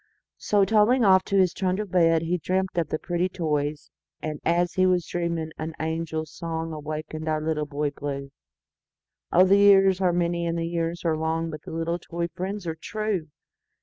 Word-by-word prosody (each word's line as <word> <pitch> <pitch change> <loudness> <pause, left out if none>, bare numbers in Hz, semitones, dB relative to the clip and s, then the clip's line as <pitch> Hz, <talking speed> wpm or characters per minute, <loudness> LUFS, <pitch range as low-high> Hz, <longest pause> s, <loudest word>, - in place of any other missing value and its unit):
So, 205 -2 +3
toddling 225 +4 +4
off 190 -1 +6
to 200 - 0
his 185 -2 +4
trundle 190 +2 -1
bed, 165 -3 +3
He 175 +2 -1
dreamt 185 +3 -1
of 165 -3 0
the - - -1
pretty 175 +3 -1
toys; 150 -4 -2 0.3
And, 155 -1 -4
as 175 +1 +1
he 185 0 +3
was 180 -2 +2
dreaming, 170 -2 -2
an 160 +1 -4
angel 160 0 -2
songAwakened 155 -1 -5
our 155 -1 +1
Little 155 -1 -2
Boy 145 0 -2
Blue—Oh! 140 +5 -3
the 195 +1 +5
years 195 -2 +6
are 180 -2 +3
many, 170 -1 0
the 165 0 -2
years 170 +1 -3
are 160 -1 +2
long, 160 +1 -1
But 155 -1 -7
the - - -7
little 165 +1 -2
toy 170 0 -4
friends 190 +2 -5
are 165 - -2
true! 205 0 -3
170 Hz, 175 wpm, -25 LUFS, 160-185 Hz, 0.3 s, off